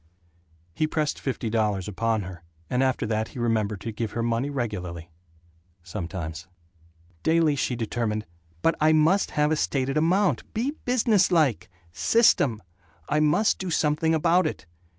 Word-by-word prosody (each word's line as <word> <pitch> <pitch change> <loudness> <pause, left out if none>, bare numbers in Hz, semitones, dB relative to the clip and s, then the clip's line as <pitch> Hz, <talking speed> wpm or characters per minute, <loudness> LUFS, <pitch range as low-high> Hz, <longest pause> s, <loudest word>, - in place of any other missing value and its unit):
He 155 - 0
pressed 155 -1 -1
fifty 130 -3 -3
dollars 105 -4 0
upon 110 +1 -1
her, 90 -2 -9 0.3
and 125 - +1
after 130 -1 +1
that 110 0 -1
he - - -13
remembered 110 -4 0
to 115 - -4
give 110 0 -4
her 115 - -2
money 120 +4 0
regularly... 90 -10 -4 0.7
sometimes. 85 -1 -6 0.7
Daily 160 -2 +3
she 130 -2 -1
determined, 110 -2 -2 0.4
"But 165 - +4
I 155 +1 +5
must 160 +6 +3
have 150 +1 +3
a - - +3
stated 135 -1 -1
amount 180 +5 +1
be 245 +6 0
business 225 -6 +3
like. 150 - +2 0.2
System. 130 - +3 0.5
I 150 - +2
must 155 +8 +2
do 190 - -4
something 160 0 +1
about 170 +3 +3
it." - - -6
130 Hz, 150 wpm, -25 LUFS, 110-160 Hz, 0.7 s, I